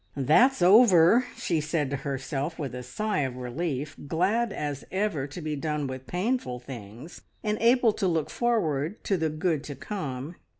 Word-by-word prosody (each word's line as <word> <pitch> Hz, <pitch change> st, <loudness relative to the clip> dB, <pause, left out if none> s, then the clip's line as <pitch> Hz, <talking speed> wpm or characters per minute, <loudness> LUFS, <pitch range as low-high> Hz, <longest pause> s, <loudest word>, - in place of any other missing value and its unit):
"That's 175 Hz, -, +4 dB
over!" 200 Hz, +2 st, +6 dB
she 165 Hz, -3 st, 0 dB
said 150 Hz, -2 st, -1 dB
to 140 Hz, -, -1 dB
herself 140 Hz, +3 st, -3 dB
with 140 Hz, -6 st, -4 dB
a 125 Hz, -, -5 dB
sigh 205 Hz, -, -2 dB
of 130 Hz, -3 st, -1 dB
relief, 140 Hz, +3 st, -3 dB
glad 200 Hz, +9 st, +1 dB
as 145 Hz, -5 st, -4 dB
ever, 190 Hz, -8 st, -1 dB
to 145 Hz, +5 st, -8 dB
be 155 Hz, -1 st, -3 dB
done 150 Hz, 0 st, -2 dB
with 130 Hz, -1 st, -6 dB
painful 185 Hz, -, -1 dB
things 125 Hz, -, -10 dB, 0.2 s
and 210 Hz, 0 st, 0 dB
able 235 Hz, -1 st, +4 dB
to 200 Hz, -2 st, -1 dB
look 165 Hz, -4 st, 0 dB
forward 185 Hz, -, 0 dB
to 195 Hz, -, +1 dB
the 160 Hz, -3 st, 0 dB
good 155 Hz, -1 st, -1 dB
to 145 Hz, -, -6 dB
come. 140 Hz, 0 st, -5 dB
155 Hz, 170 wpm, -27 LUFS, 135-195 Hz, 0.2 s, over